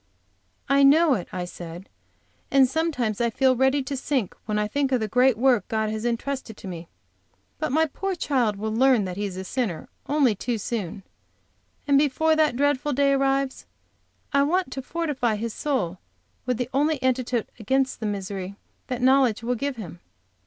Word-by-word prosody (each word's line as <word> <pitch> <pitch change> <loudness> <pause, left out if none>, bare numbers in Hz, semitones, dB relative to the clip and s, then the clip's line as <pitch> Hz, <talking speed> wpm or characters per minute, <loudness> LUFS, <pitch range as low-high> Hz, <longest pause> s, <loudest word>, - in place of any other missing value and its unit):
"I 275 0 +4
know 295 +2 +6
it," 185 -8 -2
I 180 -1 -3
said, 175 +1 -9 0.6
"and 270 -2 +5
sometimes 255 -7 -1
I 235 - +2
feel 260 +3 +2
ready 265 +2 +2
to 275 +1 -4
sink 260 -6 -1
when 210 -1 0
I 210 0 +1
think 275 +4 -1
of 255 - +3
the 220 - -2
great 250 +2 +3
work 250 -2 +3
God 220 -1 -1
has 220 +1 -4
intrusted 240 -1 -3
to - - -9
me. 170 -2 -7 0.7
But 310 -3 -1
my 320 +3 +3
poor 380 +6 -3
child 250 -10 0
will 215 +2 -3
learn 250 -2 +4
that 180 -1 -5
he 205 +2 -2
is 190 -2 -5
a 190 - -4
sinner 190 -4 -3 0.2
only 280 -5 +3
too 230 +4 -3
soon, 200 -3 -4 0.8
and 280 -1 +5
before 315 +2 +2
that 310 -5 +2
dreadful 285 +1 +1
day 280 +1 +3
arrives 275 0 0 0.7
I 280 - +4
want 335 +1 +1
to 265 - -4
fortify 280 -7 -1
his 225 +1 -4
soul 195 - -2 0.5
with 250 -2 0
the 250 0 -3
only 295 +2 +2
antidote 255 -2 0
against 265 +5 0
the 220 - -2
misery 195 -1 -4 0.3
that 250 -1 -3
knowledge 260 -4 +4
will 245 +2 0
give 275 +3 -2
him. 175 -6 -8
255 Hz, 180 wpm, -25 LUFS, 215-275 Hz, 0.8 s, know